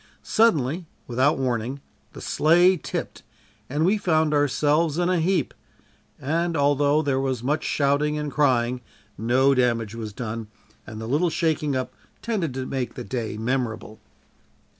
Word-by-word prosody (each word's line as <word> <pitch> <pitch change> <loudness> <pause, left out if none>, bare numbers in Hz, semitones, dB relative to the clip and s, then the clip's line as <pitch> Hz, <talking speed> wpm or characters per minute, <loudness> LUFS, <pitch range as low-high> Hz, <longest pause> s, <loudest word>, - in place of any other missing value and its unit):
Suddenly, 165 - +2 0.2
without 130 +5 +2
warning, 125 0 -2 0.3
the - - -10
sleigh 175 +4 +4
tipped 165 - -5 0.5
and 150 +4 0
we 205 +4 +2
found 160 -4 +2
ourselves 150 +2 +2
in 175 0 +1
a 185 -2 +2
heap, 180 +3 0 0.7
and 165 +4 -1
although 145 +1 +3
there 135 -2 0
was 130 -3 -2
much 150 +4 0
shouting 145 +1 +1
and 150 -1 -3
crying, 125 -4 +1 0.3
no 130 +5 +3
damage 115 -4 +1
was 110 -2 -6
done, 115 0 -5 0.4
and 110 -1 -8
the 110 - -5
little 150 +8 +2
shaking 155 -3 0
up 130 -1 -3 0.3
tended 205 - -1
to 130 -1 -3
make 130 -2 -3
the - - -6
day 110 0 -4
memorable. 115 -2 -3
140 Hz, 145 wpm, -24 LUFS, 125-155 Hz, 0.7 s, sleigh